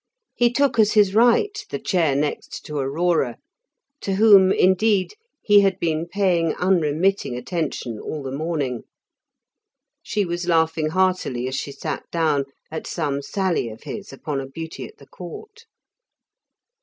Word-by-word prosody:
He 240 -1 +2
took 275 -2 +1
as 215 -1 +4
his 205 -3 +4
right 245 - +4 0.2
the - - -3
chair 180 -9 +1
next 145 +1 -3
to 150 -1 -4
Aurora, 140 -1 0 0.6
to 195 - -2
whom, 200 -2 +7
indeed, 190 - +2 0.3
he 205 -1 +6
had 195 -2 +2
been 165 0 -1
paying 175 -4 +1
unremitting 180 -4 +1
attention 135 - -4
all 150 -2 -5
the 135 - -5
morning. 140 -4 -2 1.2
She 210 -1 -1
was 175 0 -4
laughing 160 -2 +2
heartily 180 -9 0
as 130 - -4
she 140 - -4
sat 155 +1 -5
down, 155 -4 +1 0.3
at 160 - -5
some 145 -4 -2
sally 185 - -1
of 110 0 -12
his 200 -2 -7
upon 135 +1 -4
a 135 - -7
beauty 160 +4 -7
at - - -18
the 140 - -16
Court. 425 - -11
170 Hz, 145 wpm, -22 LUFS, 145-195 Hz, 1.2 s, whom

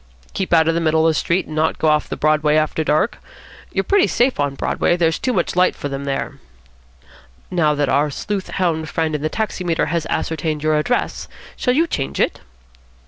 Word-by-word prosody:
"Keep 190 - -3
out 160 -2 +5
in 165 - +3
the 170 - 0
middle 160 0 +2
of 165 - +5
the - - -2
street, 170 +4 0
and 155 - -8
not 155 +1 +1
go 160 - 0
off 150 0 +2
the - - -4
Broadway 150 0 +2
after 155 +1 +1
dark. 155 +9 +1 0.5
You're - - 0
pretty 405 -1 +3
safe 245 - +1
on 145 -1 0
Broadway. 175 - 0
There's 165 -2 +1
too 255 - 0
much 185 -7 -1
light 180 0 +3
for 145 - -5
them 140 0 -5
there." 140 -1 -3 1.1
"Now 155 -4 +2
that 145 -1 0
our 145 +3 +2
sleuth 195 +7 -4
hound 160 -4 -1
friend 160 -1 -1
in 150 - -2
the 155 - -1
taximeter 180 -5 -1
has 170 -2 -1
ascertained 155 -1 -2
your 155 0 +2
address, 150 +12 -1 0.3
shall 250 -1 0
you 325 +4 +3
change 135 - -3
it?" - - +1
160 Hz, 205 wpm, -20 LUFS, 150-180 Hz, 1.1 s, out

